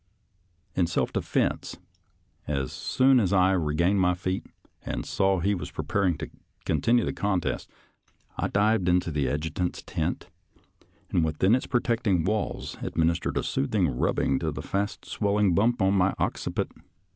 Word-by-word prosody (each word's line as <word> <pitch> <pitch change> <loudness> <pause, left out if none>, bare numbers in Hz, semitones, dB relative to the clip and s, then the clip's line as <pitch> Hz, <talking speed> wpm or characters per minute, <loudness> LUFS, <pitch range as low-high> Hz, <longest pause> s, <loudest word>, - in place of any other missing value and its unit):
In 90 -2 +1
self 85 - -1
defense, - - -1 0.7
as 70 -3 -2
soon 130 0 +3
as 100 -5 +1
I 95 -1 +4
re 80 -5 0
gained 95 +5 +3
my 90 -1 +3
feet 95 +1 -3 0.4
and - - -4
saw 95 0 +1
he 100 +4 +1
was 90 - -4
preparing 95 -5 0
to 80 - -6 0.4
con - - 0
tinue 120 0 +3
the - - -2
contest, 100 -3 -1 0.7
I - - -1
dived 100 -2 +2
into 90 -1 +2
the 70 -3 0
adjutant's 80 +5 -2
tent, - - -3 0.8
and 85 - +2
within 80 +6 +2
its 130 - +1
protecting 115 -8 +1
walls 105 +2 -2
adminis 85 +1 0
tered - - -3
a - - 0
soothing 90 +4 0
rubbing 65 +2 +1
to - - -1
the - - -6
fast 100 +1 -2
swelling 100 -2 +1
bump 110 +4 +2
on 95 +1 +3
my 95 0 +2
occiput. - - -2
95 Hz, 155 wpm, -27 LUFS, 85-100 Hz, 0.8 s, I